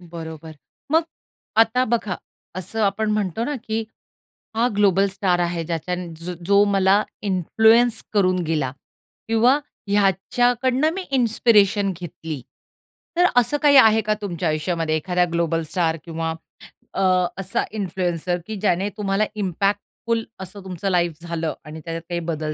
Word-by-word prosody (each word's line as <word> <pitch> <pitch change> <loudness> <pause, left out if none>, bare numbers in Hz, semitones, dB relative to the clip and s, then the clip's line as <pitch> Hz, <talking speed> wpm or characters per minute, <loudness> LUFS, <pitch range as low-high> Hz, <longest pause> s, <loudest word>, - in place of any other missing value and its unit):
बरोबर. 160 -2 -8 0.4
मग 325 - +5 0.6
आता 225 +3 +4
बघा, 220 -5 -1 0.4
असं 205 +4 -3
आपण 210 +2 +1
म्हणतो 210 +1 -1
ना, 295 - -2
की 220 0 -2 0.7
हा 235 +2 +3
ग्लोबल 200 -1 +4
स्टार 190 -2 0
आहे, 170 -1 -1
ज्याच्यान 175 +1 -4
ज 175 +2 -5
जो 200 +1 +5
मला 200 +1 +3 0.2
इन्फ्लुअन्स 220 +5 +3
करून 185 -3 +3
गेला, 155 -5 -1 0.6
किंवा 230 +5 +4 0.3
ह्याच्याकडनं 245 - +2
मी 380 - -3
इन्स्पिरेशन 215 -5 +3
घेतली. 160 -4 -6 0.8
तर 355 - +5
असं 245 +4 +3
काही 290 -2 +5
आहे 220 -3 +7
का 215 0 0
तुमच्या 175 -4 -2
आयुष्यामध्ये 155 0 -1
एखाद्या 180 +3 +1
ग्लोबल 165 -1 0
स्टार 165 -3 +1
किंवा 165 -1 -3 0.6
अ, - - 0 0.4
असा 195 0 -1
इन्फ्लुएन्सर, 180 -3 -1
की 220 - -4
ज्याने 195 -1 +1
तुम्हाला 200 0 +1
इम्पॅक्टफुल 205 +4 -1 0.2
असं 190 +1 -8
तुमचं 190 +1 -3
लाईफ 175 -2 +2
झालं 165 -2 -3
आणि 155 +1 -8
त्याच्यात 165 0 -4
काही 175 - -1
बदल 155 -2 -3
195 Hz, 135 wpm, -22 LUFS, 170-220 Hz, 0.8 s, आहे